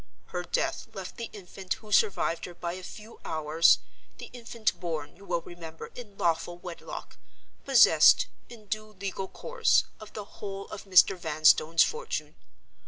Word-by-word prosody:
Her 180 - -3
death 175 - -2
left 190 -2 -7
the 230 - -5
infant 190 -1 -5
who 215 -1 -15
survived 195 -5 +2
her 175 - -10
by 170 0 -4
a 185 - -7
few 215 +4 -11
hours 155 +1 +4 0.4
(the - - -10
infant 230 -2 -2
born, 160 -5 -4
you 200 - -16
will 175 -2 -1
remember, 165 -2 -9
in 210 -5 -11
lawful 170 +1 0
wedlock) 175 -1 -8 0.5
possessed, - - +7 0.2
in 225 -3 -13
due 215 +1 -5
legal 195 0 -4
course, 470 - +2 0.2
of 215 -1 -12
the 210 - -6
whole 195 -1 -7
of - - -8
Mr. 190 0 +6
Vanstone's 160 -1 +4
fortune. 475 +2 -3
190 Hz, 155 wpm, -28 LUFS, 170-215 Hz, 0.5 s, possessed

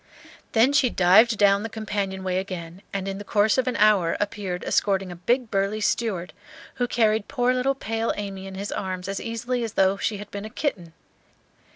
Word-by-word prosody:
Then 245 +5 +4
she 280 -3 +4
dived 215 +5 +5
down 200 -1 +4
the 225 - -4
companion 200 -3 -3
way 185 0 0
again, 180 -2 -7
and 195 -1 -3
in 195 0 -4
the - - -6
course 210 +4 +2
of 255 - 0
an 255 - 0
hour 205 -6 +3
appeared 200 -3 -3
escorting 195 -2 +1
a - - -7
big 235 +7 0
burly 195 +2 0
steward, 205 -4 -1 0.4
who 245 - 0
carried 220 -3 +1
poor 250 -2 +1
little 260 +2 +1
pale 225 -3 -2
Amy 195 -2 -5
in 190 - -8
his 200 +2 -5
arms 185 -1 -4
as 195 0 -3
easily 240 +2 -2
as 225 - -4
though 195 +1 +3
she 210 +1 -1
had 205 +1 -10
been 200 0 -5
a 215 - -6
kitten. 190 - -3
205 Hz, 200 wpm, -24 LUFS, 190-225 Hz, 0.4 s, dived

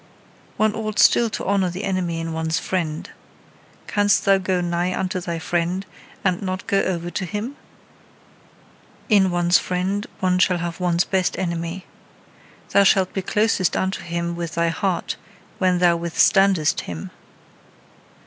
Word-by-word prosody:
One 215 -1 +2
ought 215 -1 -4
still 235 -1 +5
to - - -5
honour 195 -2 +1
the 180 +4 -6
enemy 185 -4 -1
in 165 0 -4
one's 160 -1 -1
friend. 160 -4 -2 0.8
Canst 205 -1 +2
thou 195 -1 +5
go 185 -1 0
nigh 175 +1 -1
unto 185 -1 -1
thy 170 -1 -4
friend, 175 +3 -1 0.4
and 185 -2 +1
not 185 -1 -4
go 195 0 +2
over 175 -2 -2
to 190 - -3
him? 210 +9 -4 1.5
In 200 -3 +5
one's 175 0 +3
friend 190 +3 -2
one 180 -1 +1
shall 180 -1 +3
have 170 0 -4
one's 175 -1 +2
best 190 -2 0
enemy. 170 0 -3 0.9
Thou 200 - +5
shalt 190 -1 +3
be 190 - -1
closest 210 -1 +1
unto 190 +1 -1
him 170 0 -3
with 170 -2 -5
thy 170 0 +2
heart 180 +2 -2 0.4
when 185 -1 +3
thou 175 -1 +4
withstandest 170 0 +3
him. 85 -2 -7
180 Hz, 150 wpm, -22 LUFS, 170-195 Hz, 1.5 s, still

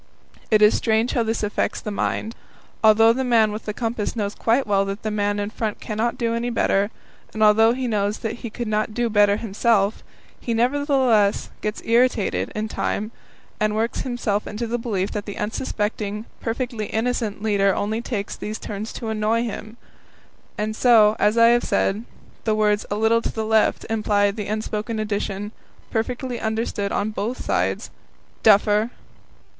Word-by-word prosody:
It 215 -1 +5
is 210 - +6
strange 225 +1 +1
how 240 - +2
this 225 -1 -1
affects 210 - -1
the 210 - -5
mind. 220 +2 -2 0.5
Although 220 +1 +6
the 265 +2 -1
man 230 -4 +3
with 215 +1 -6
the 210 - -2
compass 225 0 -3
knows 205 -2 -2
quite 235 +6 +1
well 200 -2 +2
that 195 +1 -5
the 215 - -2
man 205 -1 0
in 205 +1 -3
front 220 -2 -3
cannot 225 +2 -2
do 230 -1 0
any 235 +1 -1
better, 205 -3 +1 0.5
and 220 - +1
although 220 +2 +6
he 255 +1 -3
knows 210 -2 0
that 225 - -2
he 235 - -6
could 235 +2 -5
not 215 0 -1
do 240 -1 0
better 205 -1 +4
himself, 215 -1 +1 0.4
he 235 - -2
nevertheless 255 -4 +2
gets 210 0 -3
irritated 235 -2 +2
in 215 +1 -2
time 215 0 -2 0.5
and 215 0 +1
works 225 +2 -1
himself 225 -5 -2
into 215 +3 -4
the 235 +1 -2
belief 205 -5 -2
that 210 0 -4
the 205 - -6
unsuspecting, 210 -1 -3
perfectly 230 -2 -3
innocent 220 -2 -2
leader 200 -2 +2
only 215 +3 -1
takes 210 -5 -4
these 215 +1 -5
turns 210 +1 -6
to 225 - -5
annoy 220 +2 +1
him; 220 0 -6 0.8
and 215 +1 -2
so, 220 -3 +5
as 210 +2 +3
I 230 0 +7
have 240 0 +3
said, 210 +4 0 0.4
the 215 -1 +1
words 210 -1 +1
"A 205 - -1
little 220 +2 +3
to - - -3
the 220 -1 -3
left" 220 0 +2
imply 210 -2 +2
the 210 0 -5
unspoken 215 +1 -3
addition 205 -1 -3 0.4
perfectly 245 +2 -2
understood 220 -2 -2
on 210 +2 -1
both 220 +4 -4
sides - - -1 0.5
"Duffer!" 210 +1 +4
220 Hz, 170 wpm, -22 LUFS, 210-230 Hz, 0.8 s, I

